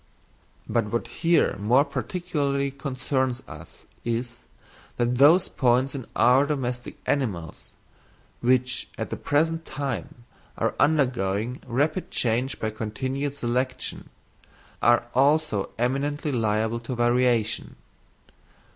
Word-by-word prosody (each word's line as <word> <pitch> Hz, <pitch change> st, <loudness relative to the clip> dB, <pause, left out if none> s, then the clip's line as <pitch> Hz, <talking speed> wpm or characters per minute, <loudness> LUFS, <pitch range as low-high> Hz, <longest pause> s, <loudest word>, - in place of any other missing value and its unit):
But 115 Hz, -2 st, +1 dB
what 115 Hz, +3 st, -2 dB
here 170 Hz, 0 st, +2 dB
more 125 Hz, +8 st, +4 dB
particularly 140 Hz, -, -2 dB
concerns 130 Hz, -2 st, -2 dB
us -, -, -12 dB, 0.2 s
is, 120 Hz, +1 st, -3 dB, 0.6 s
that 120 Hz, +1 st, 0 dB
those 160 Hz, +6 st, +6 dB
points 130 Hz, +1 st, +2 dB
in 135 Hz, -4 st, -6 dB
our 130 Hz, +4 st, +5 dB
domestic 125 Hz, -4 st, -3 dB
animals, 95 Hz, -, -2 dB, 0.7 s
which 125 Hz, 0 st, +2 dB
at -, -, -4 dB
the -, -, -1 dB
present 160 Hz, +3 st, 0 dB
time 135 Hz, -4 st, -5 dB, 0.3 s
are -, -, 0 dB
undergoing 125 Hz, -6 st, +1 dB
rapid 145 Hz, +8 st, 0 dB
change 125 Hz, +3 st, 0 dB
by 110 Hz, -, -1 dB
continued 130 Hz, +6 st, -3 dB
selection, 125 Hz, 0 st, -2 dB, 0.7 s
are 120 Hz, 0 st, +4 dB
also 140 Hz, -5 st, +2 dB
eminently 140 Hz, +5 st, -1 dB
liable 110 Hz, -1 st, 0 dB
to 120 Hz, +2 st, -5 dB
variation. 120 Hz, -2 st, +1 dB
125 Hz, 105 wpm, -25 LUFS, 120-140 Hz, 0.7 s, those